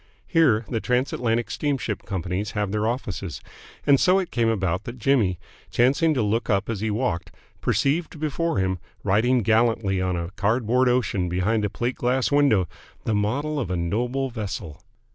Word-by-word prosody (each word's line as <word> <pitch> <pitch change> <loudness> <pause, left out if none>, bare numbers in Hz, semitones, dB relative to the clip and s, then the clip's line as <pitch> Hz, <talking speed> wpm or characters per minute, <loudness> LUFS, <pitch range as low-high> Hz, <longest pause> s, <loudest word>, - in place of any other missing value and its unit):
Here 130 - +3
the 115 - -1
Trans 125 +2 0
Atlantic 115 -1 0
steamship 135 -8 -2
companies 95 +2 -3
have 105 -2 -1
their 105 +1 0
offices, 100 - -3 0.5
and 140 -2 +5
so 185 +1 +4
it 190 -2 -2
came 115 -2 +2
about 95 -3 -1
that 120 +1 -7
Jimmy, 115 -7 +2 0.3
chancing 140 +6 +3
to 125 - +1
look 110 +4 0
up 100 +1 +1
as 110 - -3
he 110 +2 -1
walked, 100 -6 -1 0.3
perceived 155 +2 0
before 155 -1 -1
him, 95 -1 0 0.2
riding 120 +5 +2
gallantly 110 -3 +2
on 90 -1 0
a 85 0 -4
cardboard 115 +5 +2
ocean 105 -7 +1
behind 100 +5 +1
a 105 - 0
plate 120 +5 -2
glass 125 +2 +1
window, 140 -11 +4 0.4
the 110 - 0
model 140 +9 0
of 120 - -3
a 90 - -1
noble 120 +10 -1
vessel. 100 - -5
115 Hz, 170 wpm, -24 LUFS, 100-130 Hz, 0.5 s, and